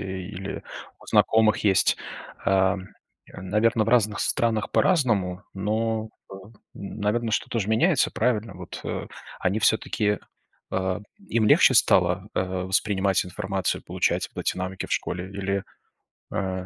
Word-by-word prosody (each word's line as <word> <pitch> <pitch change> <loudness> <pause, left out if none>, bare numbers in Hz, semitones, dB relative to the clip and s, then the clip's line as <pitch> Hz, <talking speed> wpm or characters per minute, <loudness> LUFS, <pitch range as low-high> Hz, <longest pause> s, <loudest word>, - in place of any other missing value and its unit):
или 95 0 -6 0.4
у - - -17
знакомых 110 -1 +4
есть. 100 -3 +3 0.5
Э, 95 0 +3 0.6
м, 95 - -9
наверно, 110 +2 +2
в - - -3
разных 110 -3 +2
странах 110 -3 0
по-разному, 105 - +2
но, 110 +2 -1 0.2
м, 95 +3 -12 0.2
наверно, 105 +3 -2
что-то 115 - -1
ж 100 - -1
меняется, 125 - +3
правильно? 110 -4 0
Вот, 90 -1 -8
э, - - -4 0.3
они 95 +4 +1
все-таки, 105 -1 +1 0.5
э, 95 0 -1 0.3
им 115 -2 +2
легче - - +6
стало, 90 +2 +3
э, - - +1
воспринимать 95 +1 0
информацию, 95 0 -2
получать - - -1
вот - - -4
эти - - -1
навыки 95 0 -4
в - - -6
школе 90 +1 -2
или, 100 0 -2 0.7
э, 95 -1 -2
100 Hz, 135 wpm, -25 LUFS, 95-110 Hz, 0.7 s, легче